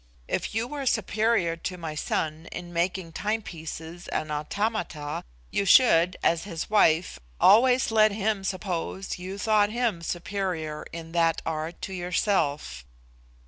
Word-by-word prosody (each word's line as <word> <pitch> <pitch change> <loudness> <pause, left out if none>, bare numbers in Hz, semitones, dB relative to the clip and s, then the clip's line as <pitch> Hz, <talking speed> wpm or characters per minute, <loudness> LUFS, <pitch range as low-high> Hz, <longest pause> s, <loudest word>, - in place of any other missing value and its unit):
If - - -2
you 225 +1 +1
were 280 0 -4
superior 220 -6 +1
to 180 +2 -5
my 165 -3 -5
son 155 +1 -2
in 175 0 -7
making 175 0 -1
timepieces 170 -5 -5
and 155 - -2
automata, 150 -1 -2 0.3
you - - +1
should, 180 -4 +5
as 165 -1 +2
his 170 -1 -5
wife, 165 - +3 0.2
always 245 +5 +5
let 215 -1 +5
him 205 -1 -1
suppose 190 0 -3
you 185 +2 -6
thought 210 0 +3
him 230 -6 -1
superior 175 -3 -3
in 165 -1 -8
that 165 -1 +2
art 160 +1 -3
to 190 - -4
yourself. 170 - -1
180 Hz, 135 wpm, -27 LUFS, 165-210 Hz, 0.3 s, should